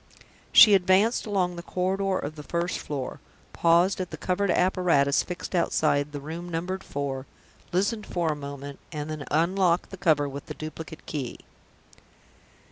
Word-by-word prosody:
She 215 -3 +9
advanced 195 +5 +3
along 185 -4 0
the - - -5
corridor 190 +2 -1
of 150 +2 -5
the 150 - -8
first 170 +3 -2
floor 140 -4 -5 0.3
paused 175 +3 +3
at 180 - -4
the - - -7
covered 190 +2 0
apparatus 175 -6 +3
fixed 180 +1 -6
outside 150 -4 +1
the 145 - -5
room 165 +5 -7
numbered 180 +3 -3
Four 140 -1 -4 0.4
listened 205 +4 0
for 170 -3 0
a - - -2
moment 140 -1 -8
and 150 -1 -4
then 155 -2 -5
unlocked 175 +2 +2
the 190 - -7
cover 155 -6 +2
with 140 0 -7
the - - -6
duplicate 155 +1 -8
key. 135 -6 -5
170 Hz, 155 wpm, -26 LUFS, 145-185 Hz, 0.4 s, She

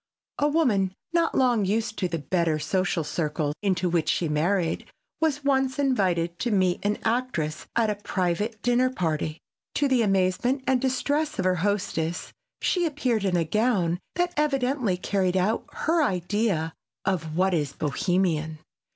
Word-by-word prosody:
A 290 - +3
woman, 220 - +2 0.2
not 335 -1 +2
long 245 -5 +3
used 215 +3 0
to 185 - +1
the 170 -1 -2
better 165 +1 0
social 185 +1 0
circle 150 -1 -1
into 185 -3 +1
which 170 -2 +1
she 170 - +1
married, 165 +3 0 0.3
was 295 -3 0
once 265 -1 +1
invited 185 -11 +1
to 240 - 0
meet 185 -4 +1
an 210 +1 +1
actress 225 -10 -1
at 225 -2 +3
a - - -2
private 195 +5 -1
dinner 245 +1 +3
party. 160 -8 -2 0.4
To 290 - +2
the 260 -3 +3
amazement 195 +6 +1
and 260 -2 +2
distress 285 +4 0
of 190 - -1
her 185 -1 +2
hostess 185 -4 -1 0.3
she 355 -2 +2
appeared 255 -8 0
in 180 -2 +2
a 165 - +1
gown 190 -4 +1 0.2
that 355 0 0
evidently 270 -8 +1
carried 185 0 0
out 205 +5 +1
her 330 +1 +1
idea 185 - 0 0.3
of 160 -5 -1
what 190 +1 +3
is 145 -4 0
"Bohemian." 160 0 0
195 Hz, 155 wpm, -26 LUFS, 170-255 Hz, 0.4 s, A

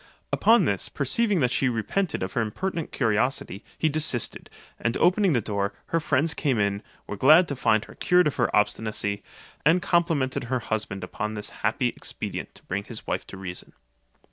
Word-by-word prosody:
Upon - - +5
this, - - -1
perceiving 215 - +1
that 125 -2 +2
she 130 - +2
repented 125 - -1
of 95 - -4
her 120 - +1
impertinent 165 - -3
curiosity, 115 -3 0
he 160 - +2
desisted; 150 -6 0 0.3
and 115 0 0
opening 185 0 +3
the 120 - +2
door, 100 +1 -2 0.2
her 165 - +2
friends 160 +1 +1
came 135 -5 0
in, 100 -1 0 0.2
were - - -5
glad 155 - +6
to 140 - -2
find 115 -3 +2
her - - -13
cured 180 0 +3
of 150 - -1
her 120 - +2
obstinacy, 105 -1 0 0.4
and 160 +5 +5
complimented 165 -8 +1
her 130 +2 0
husband 110 -4 -3
upon 110 -2 -4
this 105 - -5
happy - - +1
expedient - - -5
to - - -14
bring 100 +2 -3
his 115 -2 -7
wife - - -3
to 100 - -9
reason. 90 -2 -5
125 Hz, 180 wpm, -26 LUFS, 105-160 Hz, 0.4 s, glad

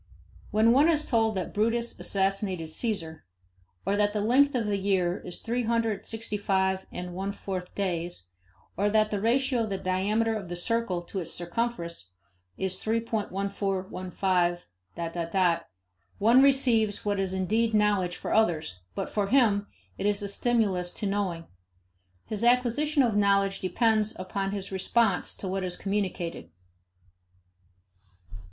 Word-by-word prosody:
When 220 +2 +4
one 285 +6 +5
is 310 -2 +2
told 225 -3 +2
that 185 -2 -3
Brutus 230 +3 0
assassinated 190 -4 0
Caesar, 165 -6 -3 0.6
or 200 - +1
that 205 0 +2
the 210 - 0
length 265 +6 +4
of 235 -3 0
the 205 -1 0
year 190 -2 +1
is 180 - -8
three 240 +2 -1
hundred 225 -3 -1
sixty 225 -2 -3
five 190 -1 0
and 180 0 -6
one 195 +2 -3
fourth 185 -3 -6
days, 175 - -2 0.5
or 205 +2 +1
that 215 0 +2
the 205 -2 -1
ratio 250 +2 +2
of 220 - -2
the 195 - -2
diameter 210 +5 0
of 195 -5 -5
the 175 - -4
circle 185 -1 0
to 190 +3 -5
its 170 -2 -3
circumference 175 - -3 0.5
is 190 0 -2
3.1415... 185 - -1 0.6
one 230 +5 +6
receives 245 -7 +3
what 205 -1 0
is 190 -1 0
indeed 220 +4 +1
knowledge 205 -4 +2
for - - -4
others, 160 - +1 0.2
but - - -2
for 205 -2 -1
him 210 -4 +3 0.3
it 200 - 0
is 205 0 0
a - - -2
stimulus 200 -5 +1
to - - -4
knowing. 195 -4 -1 0.8
His 215 0 -4
acquisition 250 +5 +3
of 230 -4 +1
knowledge 200 -1 +2
depends 215 +3 +1
upon 195 +1 -3
his 200 -1 -4
response 195 +1 +1
to 195 - -6
what 190 +1 -2
is 180 -1 -3
communicated. 185 - -3
200 Hz, 145 wpm, -28 LUFS, 185-225 Hz, 0.8 s, one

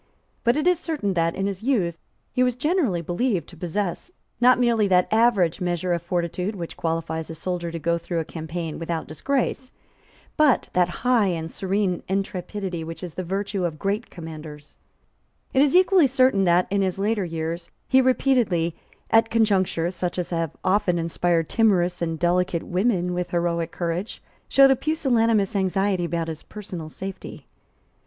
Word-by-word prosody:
But 235 +4 +3
it 305 - 0
is 360 -2 +3
certain 290 - -2
that, 165 -1 +1
in 195 - -1
his 195 -2 -3
youth, 200 -10 0 0.3
he 255 - +1
was 250 -1 +2
generally 260 - 0
believed 180 - -1
to 175 - -13
possess, 175 - -3 0.3
not 250 +1 +6
merely 235 -4 +3
that 180 -1 +3
average 210 -7 +3
measure 175 0 0
of 170 - -1
fortitude 180 +3 -2
which 170 -3 -6
qualifies 160 -1 -3
a 165 - -6
soldier 175 +1 -3
to 165 - -5
go 170 +1 0
through 170 +1 -4
a 165 - -1
campaign 160 0 -5
without 165 -1 -3
disgrace, 260 - -2 0.7
but 300 -4 +3
that 180 -1 +3 0.2
high 245 -5 +4
and 165 -3 -3
serene 190 -2 -1
intrepidity 190 -2 -3
which 165 +3 -8
is 175 -3 -6
the 185 - -4
virtue 195 +2 -2
of 165 -3 -2
great 200 +6 -2
commanders, 155 -3 -10 0.8
It 265 - +4
is 290 +3 +3
equally 370 -4 +6
certain 255 -6 +3
that, 175 +1 +4
in 200 0 +2
his 190 -1 0
later 205 +1 0
years, 165 0 -4 0.2
he 265 0 +5
repeatedly, 240 - +2 0.4
at 225 0 +5
conjunctures 190 -6 +1
such 180 0 -3
as 180 -1 -3
have 165 -3 -2
often 190 -2 +2
inspired 165 0 0
timorous 180 -6 +2
and 165 -1 -1
delicate 175 0 +1
women 180 -2 0
with 180 0 -2
heroic 170 -1 -1
courage, 175 +4 -3 0.3
showed 275 0 +6
a - - +5
pusillanimous 230 -9 +1
anxiety 195 -1 +1
about 170 -1 -2
his 160 -1 -5
personal 185 -7 -8
safety. 190 +4 -8
180 Hz, 165 wpm, -24 LUFS, 170-225 Hz, 0.8 s, not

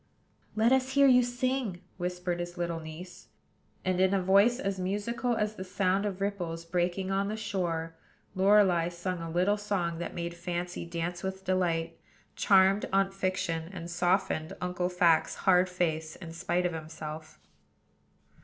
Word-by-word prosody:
"Let 220 +3 +3
us 265 0 +2
hear 280 0 +6
you 250 -2 +7
sing," 245 -6 -2
whispered 180 -1 -2
his 175 +1 -5
little 170 -1 -2
niece; 165 +3 -10 0.6
and, 185 -1 +1
in 190 +1 +4
a - - +2
voice 200 +6 +4
as 195 -6 -2
musical 210 +6 -1
as 210 0 0
the 185 - -7
sound 190 +2 0
of 195 -1 -5
ripples 175 -5 -3
breaking 180 +2 -1
on 195 +1 +1
the 215 +1 -3
shore, 175 -7 -2 0.4
Lorelei 190 -3 +4
sung 175 0 -4
a 165 - -5
little 180 +5 +2
song 185 -5 -2
that 175 - -5
made 170 0 -3
Fancy 175 0 -4
dance 170 +1 -3
with 190 0 -5
delight, 170 -3 0 0.4
charmed 195 +1 +4
Aunt 195 0 +2
Fiction, 180 -4 -2
and 175 -3 -7
softened 175 -2 0
Uncle 180 0 -1
Fact's 175 -3 +3
hard 185 -1 +3
face 160 -3 -1
in 170 -3 -9
spite 175 +2 -1
of 175 - 0
himself. 155 -1 -7
180 Hz, 155 wpm, -29 LUFS, 170-195 Hz, 0.6 s, you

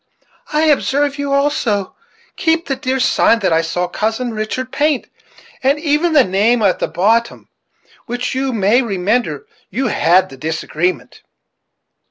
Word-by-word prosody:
I 305 +1 +1
observe 285 -1 +1
you 285 -1 -2
also 275 -8 0 0.4
keep 325 -1 +1
the 270 - -2
dear 265 0 -2
sign 230 - +3
that 185 - +1
I 160 - +3
saw 175 +2 -2
Cousin 225 +6 -2
Richard 220 +4 -4
paint; 295 -2 0 0.6
and 270 +3 +2
even 310 +2 +1
the 290 -4 +6
name 215 +4 +1
at 190 -3 +2
the - - -1
bottom, 220 +8 0
about - - -34
which, 245 +1 -3
you 265 +1 -1
may 220 +2 +2
remember, 230 - -1 0.2
you 260 -2 -1
had 180 -1 +3
the 135 - -12
disagreement." 160 0 -3
245 Hz, 150 wpm, -17 LUFS, 195-280 Hz, 0.6 s, the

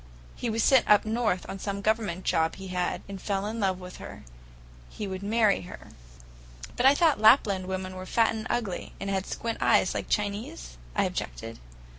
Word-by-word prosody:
He 240 - -3
was 225 0 0
sent 265 -3 +4
up 210 0 +6
north 220 -4 0
on 195 - -6
some 200 0 -3
Government 215 -5 0
job 160 0 +1
he 190 0 -9
had, 180 -1 -2
and 195 -2 -7
fell 195 -1 -1
in 220 +2 -4 0.2
with 180 0 -10
her. - - -10 0.7
He 210 - -6
would 190 0 -5
marry 210 0 +2
her." 180 - -11 0.9
"But 250 - +4
I 275 - +6
thought 310 -8 +3
Lapland 205 -5 +5
women 185 0 -4
were 185 0 -7
fat 225 +2 +2
and 220 -1 -5
ugly, 215 -7 -3
and 195 - -3
had 190 0 -1
squint 230 -1 -4
eyes, - - +3
like - - -4
Chinese?" 200 - -3 0.2
I - - +3
objected. - - -4
200 Hz, 185 wpm, -27 LUFS, 185-225 Hz, 0.9 s, up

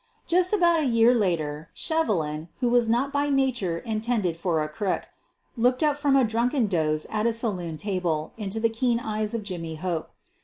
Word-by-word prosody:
Just 360 +1 +3
about 345 -5 +4
a 305 - 0
year 230 0 +5
later 165 -8 -1
Shevelin, 165 - -1
who 245 -2 +1
was 240 -1 +3
not 255 +5 +1
by 285 0 +1
nature 255 -11 +1
intended 215 -3 -1
for 165 -2 0
a - - -3
crook, 190 +5 -2 0.5
looked 250 +4 +2
up 300 -2 +3
from 285 -1 +2
a 270 - +5
drunken 235 +3 +1
doze 155 -5 0
at 215 +1 +1
a 230 - +1
saloon 185 -8 -2
table 175 -5 -2
into 210 0 -3
the 230 - +3
keen 235 +1 0
eyes 215 -1 -2
of 225 - -3
Jimmy 170 -5 -5
Hope. 165 0 -3
220 Hz, 185 wpm, -25 LUFS, 170-250 Hz, 0.5 s, year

